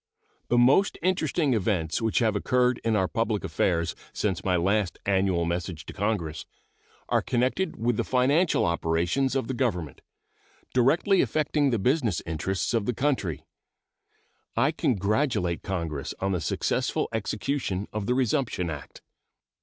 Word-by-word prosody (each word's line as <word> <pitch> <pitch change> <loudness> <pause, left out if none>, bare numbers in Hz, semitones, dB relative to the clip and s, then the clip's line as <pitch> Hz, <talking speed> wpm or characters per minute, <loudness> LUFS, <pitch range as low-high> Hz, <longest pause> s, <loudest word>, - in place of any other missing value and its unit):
The 120 - +2
most 135 +11 +4
interesting 160 -5 +1
events 90 -5 0
which 110 -1 0
have 110 -3 +2
occurred 125 +4 +1
in 115 -1 +1
our 95 -3 +2
public 115 -2 -1
affairs 85 -2 0 0.2
since 95 -5 -1
my 90 -1 +1
last 95 +2 +1
annual 95 -3 +2
message 85 -1 -3
to - - -8
Congress 100 -7 -2 0.6
are - - +3
connected 130 +9 0
with 115 0 0
the - - +1
financial 140 - +2
operations 85 +10 0
of 130 -4 0
the 130 - -2
Government, 90 - -2 0.7
directly 165 - +3
affecting 150 -2 +1
the 120 - +1
business 120 - +1
interests 85 +7 -2
of 115 -3 0
the 125 - 0
country. 115 - -1 1.1
I - - +3
congratulate 100 - 0
Congress 85 -7 -4
on 95 +1 0
the 90 -3 -1
successful - - -1
execution 105 -1 -2
of 105 -1 -3
the 125 - +2
resumption 125 - 0
act. 75 -3 -9
110 Hz, 140 wpm, -26 LUFS, 90-130 Hz, 1.1 s, most